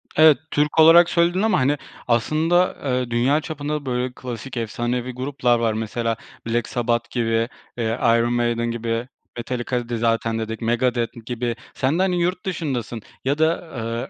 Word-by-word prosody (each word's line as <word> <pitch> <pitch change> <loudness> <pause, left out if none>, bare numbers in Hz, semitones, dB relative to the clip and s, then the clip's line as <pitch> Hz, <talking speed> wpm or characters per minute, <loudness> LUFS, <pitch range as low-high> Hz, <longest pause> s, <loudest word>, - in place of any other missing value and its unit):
Evet, 155 -2 +7
Türk 150 +2 +1
olarak 165 +2 +8
söyledin 175 +2 +2
ama, 215 -3 +3
hani, 140 +3 +2 0.3
aslında, 155 +9 +2
eee, 125 -3 -1
dünya 130 +6 +2
çapında 150 -2 -4
böyle 125 0 -1
klasik 125 +1 -7
efsanevi 120 +2 -2
gruplar 125 -2 0
var. 115 -1 +1
Mesela 115 +1 -2 0.3
Black 120 +1 0
Sabbath 120 -2 -1
gibi, 115 -1 0 0.3
eee, 115 -1 -1
Iron 115 0 +3
Maiden 120 -1 0
gibi, 115 +1 -2 0.3
Metallica'yı 120 -1 -3
zaten 115 0 +1
dedik, 110 +1 -4
Megadeth 120 0 0
gibi. 120 0 -2 0.2
Sen 140 +6 0
de, - - +3
hani, 180 -2 +1
yurt 180 +2 -1
dışındasın 130 - -3 0.2
ya 140 +2 +1
da, 160 +3 +2
aaa, 115 -7 -5
120 Hz, 155 wpm, -22 LUFS, 115-150 Hz, 0.3 s, olarak